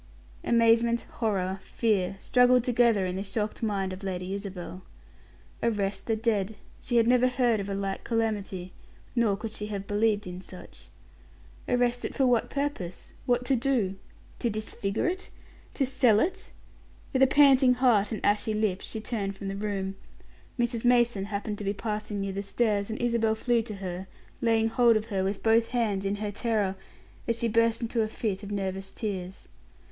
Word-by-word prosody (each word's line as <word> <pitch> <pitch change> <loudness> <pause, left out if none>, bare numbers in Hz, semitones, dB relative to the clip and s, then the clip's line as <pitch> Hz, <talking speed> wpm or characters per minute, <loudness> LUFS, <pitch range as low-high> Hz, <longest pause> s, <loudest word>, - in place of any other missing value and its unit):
Amazement, 235 0 +3 0.2
horror, 195 -4 0
fear, 200 -5 0
struggled 250 +3 +4
together 235 -5 +3
in 180 0 -2
the - - -2
shocked 210 +2 -3
mind 195 -4 -1
of 185 - -8
Lady 185 -1 -3
Isabel. 190 -2 -6 0.8
Arrest 200 -4 -1
the 225 - +2
dead. 220 -2 0 0.3
She 245 - -3
had 230 - +5
never 250 +1 +5
heard 245 -3 +2
of 200 0 -4
a 195 - -2
like 195 -1 -3
calamity: 205 -5 -2 0.4
nor 225 -5 +2
could 220 +1 -5
she 210 -1 -5
have 200 -2 -4
believed 210 0 +1
in 180 0 -7
such. 185 -1 -12 0.8
Arrest 245 0 +1
it - - -4
for 270 - +3
what 245 -2 +2
purpose? 280 -12 -4
What 245 0 +2
to 270 - +3
do? 240 -6 +1 0.5
To 235 - +1
disfigure 215 - -2
it? 370 +2 -3 0.5
to 275 - +2
sell 250 -5 +4
it? 385 - -1 0.6
With 260 - +1
a 265 - +8
panting 270 -2 +6
heart 240 -5 +3
and 215 - -3
ashy 210 +1 +2
lips, 210 -3 -1
she 220 - -4
turned 200 -4 -3
from 195 0 -5
the 195 - -4
room. 195 -2 -3 0.6
Mrs. 240 -1 0
Mason 240 -5 +3
happened 205 0 -4
to - - -5
be 200 0 0
passing 210 -1 -3
near 195 -1 -2
the 200 - -2
stairs, 205 0 0
and 220 - -4
Isabel 235 -2 +1
flew 235 +1 +1
to 220 -2 -6
her, 190 -1 -5 0.3
laying 225 -2 +3
hold 235 -1 +4
of 215 - -3
her 190 -1 +1
with 195 +2 -2
both 225 +1 +4
hands, 215 -6 -1
in 195 +1 0
her 205 0 -3
terror, 205 -3 0 0.5
as 230 -1 0
she 235 - 0
burst 230 +1 +2
into 230 0 0
a 215 - +1
fit 210 -3 -3
of 205 - -8
nervous 195 -1 -3
tears. 190 -4 -5
215 Hz, 180 wpm, -28 LUFS, 195-235 Hz, 0.8 s, a